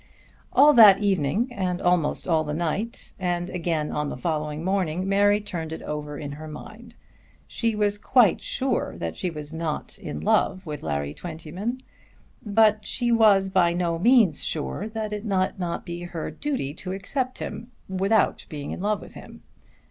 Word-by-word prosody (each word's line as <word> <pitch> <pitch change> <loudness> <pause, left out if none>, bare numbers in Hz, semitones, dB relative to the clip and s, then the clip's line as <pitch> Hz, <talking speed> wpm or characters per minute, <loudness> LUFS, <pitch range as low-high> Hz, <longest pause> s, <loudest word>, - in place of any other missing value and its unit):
All 295 +1 +7
that 215 -6 +9
evening, 200 - +1
and 185 -4 -2
almost 175 -3 +1
all 160 -3 +2
the 150 -1 -3
night, 175 +8 -3
and 175 -1 -1
again 165 -4 -1
on 150 -1 -2
the - - -5
following 150 +1 -2
morning 185 -1 0
Mary 205 +1 +4
turned 170 -6 -5
it 160 - -6
over 150 -1 -5
in 145 0 -6
her 155 +2 -8
mind. 220 +10 -11 0.5
She 230 -2 -1
was 205 -1 0
quite 235 -4 +4
sure 265 0 -1
that 80 -1 -4
she 180 - -2
was 150 -1 -8
not 160 -2 -4
in 75 - -6
love 185 - +1
with 150 -2 -5
Larry 70 0 -2
Twentyman; 175 - -5 0.6
but 215 0 +3
she 240 +2 -1
was 205 -4 +5
by 180 -2 +3
no 170 -1 -1
means 225 - +4
sure 65 - -3
that 220 -1 -4
it 210 0 -4
might 190 -3 0
not 175 -2 -3
be 170 0 -6
her 175 -2 -5
duty 270 - -3
to 185 +3 -6
accept 255 +7 -2
him 235 +2 -6 0.2
without 195 +3 +1
being 145 -2 -6
in - - -5
love 210 +1 0
with - - -12
him. - - -12
185 Hz, 170 wpm, -25 LUFS, 155-210 Hz, 0.6 s, that